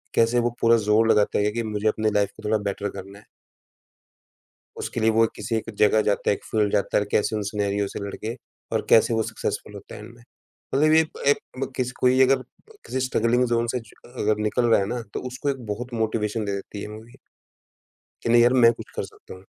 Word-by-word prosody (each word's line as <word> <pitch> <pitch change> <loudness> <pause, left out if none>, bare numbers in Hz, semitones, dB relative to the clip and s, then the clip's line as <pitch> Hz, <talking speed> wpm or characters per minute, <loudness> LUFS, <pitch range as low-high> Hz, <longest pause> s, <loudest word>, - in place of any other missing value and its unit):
कैसे 115 +1 +3
वो 120 0 +1
पूरा 115 0 +5
ज़ोर 110 +1 +4
लगाता 105 - +2
है 105 +1 +1
कि 115 +2 -2
मुझे 110 -1 -2
अपनी 110 0 +1
लाइफ़ 100 -1 +2
को - - -13
थोड़ा 110 +1 +2
बेटर 100 +1 -3
करना 100 +1 -10
है। - - -21 1.5
उसके - - -4
लिए 110 0 +4
वो 115 +1 +4
किसी 105 +2 -2
एक 110 - -4
जगह 105 +1 +4
जाता 105 -1 +1
है, - - +3
एक - - -19
फील्ड 105 -2 0
जाता 100 0 +1
और 105 - 0
कैसे 110 +1 +1
उन 105 - -2
सिनेरियो 100 0 -1
से - - -6
लड़के 110 +4 -5 0.4
और 110 - -1
कैसे 115 +1 +5
वो 110 - +1
सक्सेसफुल 105 - -4
होता 100 - -10
हैं - - -9
एंड 115 +2 -12
में। 120 - -18 0.5
मतलब 155 +3 +4
ये 160 - +7
एक 160 - -4
एक 145 - +5 0.2
ब 135 - -2
किस 125 -1 -1
कोई 130 +1 +4
अगर 135 +1 +4
अ, - - -9 0.4
किसी 130 - -2
स्ट्रगलिंग 125 -1 +2
ज़ोन 115 0 +1
से 125 - -2
जो 115 -2 -18
अ - - -19
अगर 105 0 +2
निकल 120 +3 +1
रहा 115 - +5
है 95 - -1
ना, 120 +2 -3
तो - - -2
उसको 130 +3 -3
एक 135 -3 -5
बहुत 120 +4 -5
मोटिवेशन 110 -1 -1
दे 100 - -2
देती 100 +1 -7
है - - -5
ये - - -7
मूवी 110 +2 -12 1.1
कि - - -2
नहीं 120 0 +6
यार 120 +1 +5
मैं 115 - +8
कुछ - - -11
कर - - -2
सकता - - -13
हूँ। 95 - -15
110 Hz, 240 wpm, -24 LUFS, 105-120 Hz, 1.5 s, मैं